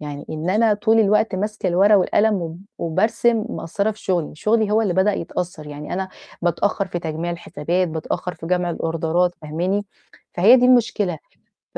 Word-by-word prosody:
يعني 145 -1 -7
إن 155 +3 -3
أنا 215 +1 +3
طول 225 +2 +3
الوقت 210 -1 +2
ماسكة 210 +3 -3
الورقة 195 +4 +5
والقلم 210 +3 +2
و 165 0 -6 0.2
وبارسم، 215 +6 +1
مقصّرة 200 0 -2
في 215 - -9
شغلي، 175 -6 -1
شغلي 215 +4 +1
هو 220 +1 +3
اللي 195 -5 0
بدأ 190 +3 +3
يتأثّر 175 -2 -4
يعني 150 0 -7
أنا 190 +1 -2 0.3
بتأخّر 195 +3 0
في 175 - -3
تجميع 165 +1 -4
الحسابات، 170 +1 -2
بتأخّر 165 +2 -4
في 165 +1 -9
جمع 180 -1 0
الأوردرات 165 +2 0
فاهماني؟ 180 +7 -2 0.5
فهي 210 +8 +7
دي 250 - +3
المشكلة 215 -9 +2 0.6
ف - - -2
180 Hz, 170 wpm, -21 LUFS, 165-210 Hz, 0.6 s, فهي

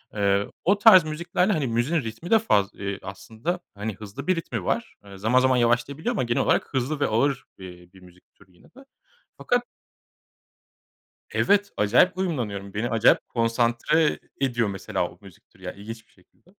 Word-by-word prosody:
Eee, 100 0 +1 0.2
o 200 +2 +3
tarz 205 -6 +8
müziklerle 170 +5 0
hani 145 -6 -1
müziğin 125 +8 0
ritmi 115 - -7
de 225 - +6
faz 100 - +2
eee 100 -1 -5
aslında 110 - -5 0.2
hani 105 +1 -4
hızlı 110 - -9
bir 185 - +3
ritmi 115 - -4
var. - - -2
Eee 100 -1 -12
zaman 115 +6 +3
zaman 130 -1 +3
yavaşlayabiliyor 130 - 0
ama 180 - 0
genel 120 0 0
olarak - - +1
hızlı 135 +3 -1
ve 140 - +2
ağır, 130 +4 0
eee, 90 -2 -12
bir 95 - -16
müzik 90 0 -20
türü 95 - -23
yine - - -23
de. 270 +2 -17 0.5
Fakat 245 0 0 1.7
Evet 200 0 +2
acayip 125 - +3
uyumlanıyorum. 105 - -3
Beni 115 +3 -2
acayip 115 +1 +3
konsantre 120 +6 +1 0.2
ediyor 120 -5 +1
mesela 95 -1 -3
o - - -18
müzik - - -17
türü - - -23
ya - - -5
ilginç 110 +2 -10
bir - - -31
şekilde. 165 - -28
120 Hz, 175 wpm, -24 LUFS, 105-160 Hz, 1.7 s, tarz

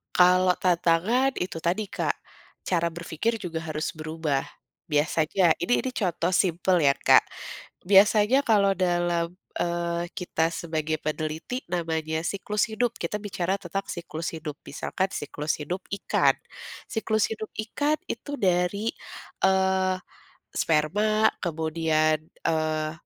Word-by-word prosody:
Kalau 180 0 +6
tantangan 180 +9 +2
itu 180 -2 -3
tadi 190 +5 0
Kak, - - -1 0.6
cara 170 -2 +1
berpikir 170 +7 -2
juga 165 -4 -4
harus 155 +2 -3
berubah, 155 -3 -2 0.5
biasanya 160 +3 +3
ini 175 +8 +1
ini - - -3
contoh 180 -2 0
simpel 180 -1 +2
ya 140 - +6
Kak, - - +6 0.6
biasanya 210 +6 +5
kalau 200 -3 +4
dalam, 175 -2 0 0.2
eee, 170 0 -1
kita 175 -4 0
sebagai 160 -2 -2
peneliti 155 - -3
namanya 160 -2 -2
siklus 200 +3 -1
hidup 235 +2 0
kita 190 +5 -3
bicara 195 -2 -2
tentang 195 0 -3
siklus 170 -1 -5
hidup 155 -3 -6
misalkan 190 +6 -3
siklus 150 +1 -3
hidup 175 +6 -4
ikan 200 - +2 0.5
siklus 220 -2 0
hidup 215 -1 -5 0.2
ikan 300 +1 +1
itu 240 +5 -5
dari, 185 +4 +1 0.5
eee, 190 0 +3 0.6
sperma 210 +8 +2
kemudian, 160 -2 +1 0.2
eee, 155 -1 0
175 Hz, 115 wpm, -26 LUFS, 160-195 Hz, 0.6 s, Kalau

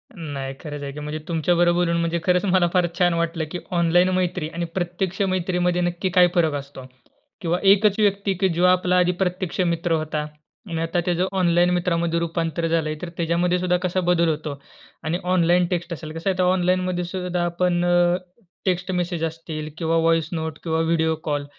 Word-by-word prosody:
नाही 140 -6 -5
खरंच 145 -3 -7
आहे 140 - -4
की. 150 - -7
म्हणजे 150 +1 -5
तुमच्याबरोबर 175 +1 +2
बोलून 170 -1 +1
म्हणजे 170 0 0
खरंच 180 +1 +2
मला 185 -2 +3
फार 180 -1 +3
छान 175 -1 +4
वाटलं 170 -1 -1
की 180 - -4 0.2
ऑनलाईन 175 +2 +3
मैत्री 180 -4 -1
आणि 170 +1 -2
प्रत्यक्ष 180 +2 -2
मैत्रीमध्ये 180 -1 0
नक्की 175 +2 -1
काय 180 -1 +5
फरक 160 -3 +3
असतो. 140 -2 -7 0.6
किंवा 175 0 0
एकच 200 +1 +4
व्यक्ती 200 -1 +2
की 190 - +4
जो 170 +1 0
आपला 180 0 +3
आधी 180 0 +3
प्रत्यक्ष 185 0 -2
मित्र 170 -1 0
होता 155 -1 -1 0.4
आणि 165 -1 -2
आता 165 +2 0
त्याचं 180 +1 +1
ऑनलाईन 175 0 +3
मित्रामध्ये 170 -1 0
रूपांतर 165 0 -2
झालंय, 160 -2 0
तर 175 - -5
त्याच्यामध्येसुद्धा 175 +2 +1
कसा 185 +1 0
बदल 170 -1 +2
होतो 150 -2 -3 0.5
आणि 160 +3 0
ऑनलाईन 180 -1 +3
टेक्स्ट 170 0 -2
असेल 155 -1 -7
कसं 165 +4 -1
आहे 185 - -1
तर - - +4
ऑनलाईनमध्येसुद्धा 180 0 0
आपण, 175 0 0
अ, 175 0 +3 0.5
टेक्स्ट 180 0 0
मेसेज 175 -2 -2
असतील 160 -1 -5
किंवा 165 0 0
व्हॉइस 165 -1 +2
नोट 160 -1 -3
किंवा 160 -1 0
व्हिडिओ 160 -1 +1
कॉल, 145 -2 -2
175 Hz, 180 wpm, -23 LUFS, 165-180 Hz, 0.6 s, काय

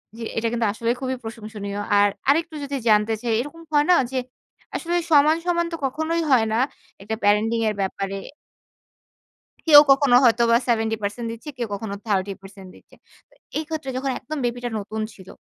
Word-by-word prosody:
জ্বি, 230 - -7
এটা 230 +1 +1
কিন্তু 235 -1 0
আসলে 230 +1 -3
খুবই 260 0 -2
প্রশংসনীয়। 215 -3 -7 0.2
আর 205 0 +5 0.2
আরেকটু 325 +2 +2
যদি 280 0 -4
জানতে 210 +1 +4
চাই 235 -2 -1
এরকম 295 +5 -9
হয় 295 0 +4
না - - +7 0.2
যে 260 - -2 0.6
আসলে 345 +1 -2 0.2
সমান, 305 +2 +5
সমান 340 -1 +1
তো - - 0
কখনোই 315 +5 -1
হয় 230 -4 +5
না। 225 - +1 0.4
একটা 215 +3 -3
প্যারেন্টিং 215 +3 +2
এর 210 - -3
ব্যাপারে 195 0 -3 1.5
কেউ 290 -2 +11
কখনো 275 -2 +5
হয়তোবা 235 0 +4
70% 225 -1 -1
দিচ্ছে, 230 +7 -8
কেউ 235 -2 -2
কখনো 200 0 -4
30% 195 -1 -3
দিচ্ছে। - - -20 0.3
তো - - -27 0.2
এই 315 - -1
ক্ষেত্রে 310 -4 -4
যখন 270 0 -1
একদম 310 +1 -6
বেবিটা 245 0 -2
নতুন 215 +2 -5
ছিল। 190 -1 -15
230 Hz, 165 wpm, -23 LUFS, 210-285 Hz, 1.5 s, কেউ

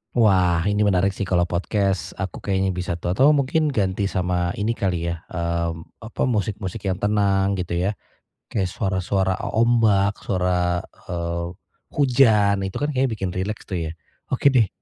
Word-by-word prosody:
Wah 90 -6 +3
ini 105 +1 +2
menarik 95 -1 +2
sih, 100 - -3
kalau 90 -2 +1
podcast 95 0 -1
aku 95 -2 -5
kayaknya 95 -2 0
bisa 90 -1 -3
tau-tau 125 - +3
mungkin 150 +2 +1
ganti 100 -4 0
sama 90 -1 0
ini 115 +3 0
kali 90 -5 -1
ya, 85 0 -4
mmm, 85 +1 -3
apa, 115 +4 -2
musik-musik 105 -4 -2
yang 95 -2 -1
tenang 100 -1 +2
gitu 90 -2 -2
ya. 100 +4 0 0.6
Kayak 95 -4 0
suara-suara 95 -1 -1
ombak 110 -4 +2
suara, 90 -1 0 0.2
eee, 85 -1 -2 0.5
hujan 110 -8 +4
itu 95 0 -4
kan 145 +1 -1
kayaknya 135 0 +1
bikin 100 -5 -3
rileks 100 +4 -3
tuh 85 -4 -3
ya. - - -5 0.4
Oke 135 +2 +3
deh. 115 -6 +4
95 Hz, 155 wpm, -23 LUFS, 90-105 Hz, 0.6 s, hujan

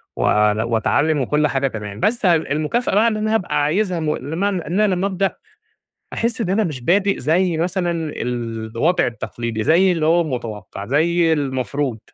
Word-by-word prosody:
ول 105 0 +2
وأتعلّم، 120 +7 +1
وكل 150 +4 +1
حاجة 135 -1 0
تمام. 105 -4 -6
بس 220 - 0
ه 175 -2 +5
المكافأة 155 +9 -1
بقى 220 +3 +4
إن 220 -2 0
أنا 215 +1 -1
هابقى 180 -8 0
عايزها 180 +4 0
م 155 -1 0
لمعنى 175 +5 -2
إن 180 +6 -1
أنا 210 -3 +3
لمّا 185 +2 0
أبدأ، 195 0 -1 0.8
أحِسْ 230 0 -1
إن 180 - -2
أنا 205 +4 +2
مش 150 -9 -4
بادئ 195 +7 +2
زي 165 +5 +1
مثلًا 175 +1 -1 0.3
الوضع 115 +5 -1
التقليدي، 115 -1 -4
زي 175 - +4
اللي 165 -3 0
هو 170 +2 +4
متوقّع، 110 - -6
زي 165 +6 +2
المفروض. 135 -3 -2
155 Hz, 170 wpm, -20 LUFS, 125-185 Hz, 0.8 s, ه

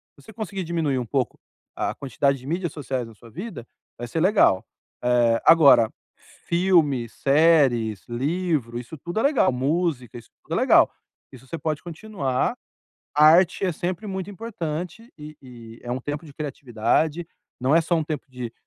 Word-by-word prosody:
se 140 - -20
você 220 - -13
conseguir 195 -3 -5
diminuir 160 -6 -1
um 120 - -3
pouco 130 -1 -2 0.4
a - - -2
quantidade 140 0 0
de 130 - -14
mídias 170 0 -2
sociais 130 -5 -4
na 115 - -14
sua 115 +2 -16
vida, 180 - -7 0.3
vai 120 0 -6
ser 160 - -3
legal. 185 - +4 0.4
Eh, 120 -2 +3
agora, 140 -9 +7 0.6
filmes, 165 - +2
séries, 135 -8 +3
livro, 135 -1 -1
isso 125 +6 -9
tudo 175 +8 -4
é - - 0
legal. 280 - +3
Música. 135 -2 -1
Isso 120 - -13
tudo - - -7
é - - +1
legal. - - +5 0.4
Isso 130 0 -15
você 165 - -5
pode 155 -2 -3
continuar. 165 -7 -2 0.6
A 150 - +6
arte 175 +4 +5
é 180 - +1
sempre 180 +6 -4
muito 190 0 -4
importante. 180 0 -6
E 150 0 -10
e 115 -3 -12
é 120 - -7
um 130 +1 -2
tempo 145 +4 -5
de 145 - -12
criatividade. 145 +3 -1 0.3
Não 135 +4 +2
é 165 - +6
só 170 +2 0
um 160 - 0
tempo 155 -1 -4
de 125 -3 -7
150 Hz, 175 wpm, -24 LUFS, 125-175 Hz, 0.6 s, agora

